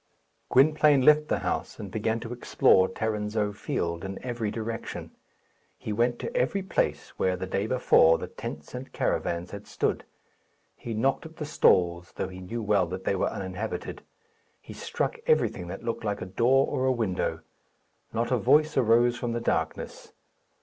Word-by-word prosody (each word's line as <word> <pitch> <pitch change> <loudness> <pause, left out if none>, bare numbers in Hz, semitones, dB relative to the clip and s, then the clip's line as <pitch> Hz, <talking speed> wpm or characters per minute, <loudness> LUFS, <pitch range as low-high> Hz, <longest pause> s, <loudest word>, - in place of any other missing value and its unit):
Gwynplaine 150 0 +5
left 150 +2 +5
the - - +1
house, - - -2
and 100 - -7
began 110 +2 -1
to 120 0 -5
explore 95 -5 +3
Tarrinzeau 105 0 -2
Field 85 -4 -3
in 95 0 -5
every 120 -4 -2
direction. 115 +1 -5 0.7
He 105 - -4
went 120 +3 +1
to - - -6
every 200 - +1
place 190 - -1
where, 95 -1 +2
the 95 - -4
day 100 +3 -1
before, 80 -10 +5
the - - -5
tents - - -8
and - - -7
caravans 85 +1 -1
had 100 0 -8
stood. - - -1 0.7
He 115 -2 -6
knocked 135 +8 0
at 160 - -17
the 150 - -5
stalls, 85 -10 +2
though 95 - -3
he 95 0 -9
knew 115 +5 -5
well 100 -4 +2
that 95 +2 -6
they - - 0
were 95 - 0
uninhabited. 95 +3 -5 0.6
He - - -11
struck 475 - -3
everything 100 - +2
that 95 +3 -7
looked 115 - -3
like 105 -3 -2
a - - -5
door 120 +8 +3
or 130 0 -1
a - - +4
window. 110 -7 -1 0.7
Not - - -1
a - - +3
voice 155 +1 +3
arose 120 0 +4
from 120 -1 -2
the 120 - -1
darkness. 115 - -3
110 Hz, 170 wpm, -27 LUFS, 95-125 Hz, 0.7 s, Gwynplaine